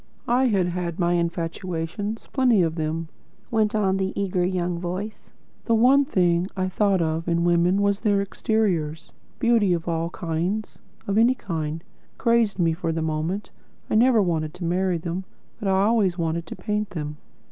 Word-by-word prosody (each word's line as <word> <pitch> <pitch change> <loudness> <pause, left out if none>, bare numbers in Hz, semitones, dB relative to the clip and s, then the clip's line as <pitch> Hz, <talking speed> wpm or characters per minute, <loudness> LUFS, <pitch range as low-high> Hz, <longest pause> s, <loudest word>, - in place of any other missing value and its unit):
"I 250 +2 +3
had 195 -7 +2
had 175 -1 -3
my 175 -1 +2
infatuations, 170 +4 -3
plenty 245 -8 +4
of 165 -1 0
them," 160 0 -2 0.4
went 215 -2 +2
on 195 -3 +2
the 190 0 -2
eager 185 -2 0
young 180 -1 -1
voice. 185 +5 -5 0.3
"The 230 - +3
one 265 +5 +5
thing 180 - +2
I 185 0 0
thought 195 -2 +2
of 160 +1 -2
in 170 0 +1
women 175 +3 +3
was 200 0 +2
their 205 -3 +2
exteriors. 185 -6 -1 0.2
Beauty 230 -6 +3
of 170 -1 -3
all 165 0 -1
kinds 175 +5 -3 0.3
of 200 +2 +1
any 240 +3 +5
kind 165 -7 -4 0.3
crazed 230 -4 +2
me 165 -3 +2
for 165 0 -2
the 160 0 -2
moment. 160 +6 -2 0.4
I - - +1
never 230 -1 +5
wanted 160 -4 -1
to 180 - -5
marry 180 +1 +1
them, 170 +3 -4 0.4
but 205 - -3
I 190 0 +3
always 205 -5 +2
wanted 165 -1 -2
to - - -7
paint 210 +2 -2
them. 150 -4 -5
180 Hz, 170 wpm, -24 LUFS, 170-210 Hz, 0.4 s, one